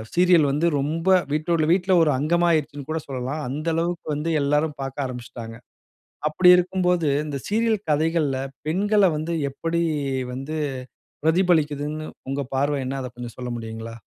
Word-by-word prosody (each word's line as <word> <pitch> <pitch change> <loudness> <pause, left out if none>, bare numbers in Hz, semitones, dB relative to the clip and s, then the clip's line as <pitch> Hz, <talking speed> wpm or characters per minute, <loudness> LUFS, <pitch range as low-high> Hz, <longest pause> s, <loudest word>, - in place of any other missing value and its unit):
Serial 175 -4 +5
வந்து 150 +4 0
ரொம்ப, 160 +6 -1 0.2
வீட்டோட 155 +1 +1
வீட்ல 190 0 +1
ஒரு 155 - +3
அங்கமா 170 +4 +2
ஆயிருச்சுன்னுகூட 150 0 -2
சொல்லலாம். 135 +3 -4
அந்த 150 +5 -4
அளவுக்கு 170 +1 -2
வந்து, 150 +3 -2
எல்லாரும் 150 +2 +1
பாக்க 135 -1 -6
ஆரம்பிச்சுட்டாங்க. 115 -2 -8 0.7
அப்பிடி 165 +4 +4
இருக்கும்போது, 180 -2 +1 0.2
இந்த 145 -2 -4
சீரியல் 225 +1 +2
கதைகள்ல 155 -2 +1 0.3
பெண்கள 205 +4 +3
வந்து 160 +2 -3 0.2
எப்படி 165 +4 -2 0.5
வந்து 135 +5 -5 0.7
பிரதிபலிக்குதுன்னு, 155 -3 +1 0.2
உங்க 135 +1 -1
பார்வை 140 +1 +1
என்ன? 135 +1 -3
அத 125 - -5
கொஞ்சம் 120 -1 -8
சொல்ல 125 -1 -5
முடியுங்களா? 115 0 -7
155 Hz, 135 wpm, -23 LUFS, 135-170 Hz, 0.7 s, சீரியல்